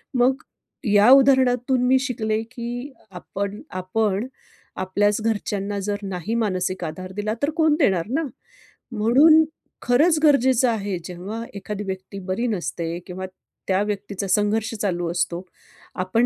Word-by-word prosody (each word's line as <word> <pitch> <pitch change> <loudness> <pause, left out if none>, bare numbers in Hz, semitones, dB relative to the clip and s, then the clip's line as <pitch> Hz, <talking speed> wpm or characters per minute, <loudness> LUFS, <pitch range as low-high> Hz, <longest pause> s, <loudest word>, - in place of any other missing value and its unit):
मग 255 +2 +2 0.5
या 205 +4 +6
उदाहरणातून 260 -2 +4
मी 260 0 +5
शिकले 220 -5 -1
की 245 +3 -5 0.2
आपण 200 +3 -5 0.2
आपण 210 +3 0 0.5
आपल्याच 205 +3 +1
घरच्यांना 205 -2 -2
जर 205 0 -1
नाही 195 +3 -3
मानसिक 185 -4 -1
आधार 185 +4 -6
दिला, 210 +1 -1
तर 290 - +3
कोण 315 -2 +4
देणार 190 - +2
ना? 315 +6 0 0.7
म्हणून 275 +9 +6 0.4
खरंच 305 +6 +4
गरजेचं 260 -4 +4
आहे, 205 -4 -2
जेव्हा 195 +6 -6
एखादी 205 +1 -5
व्यक्ती 190 0 -6
बरी 230 +6 0
नसते 170 -5 -3
किंवा 185 +1 -5 0.4
त्या 190 +1 +2
व्यक्तीचा 200 -1 -4
संघर्ष 210 +4 +1
चालू 175 -4 -1
असतो, 175 +1 -2 0.5
आपण 185 +6 +1
210 Hz, 130 wpm, -23 LUFS, 190-245 Hz, 0.7 s, या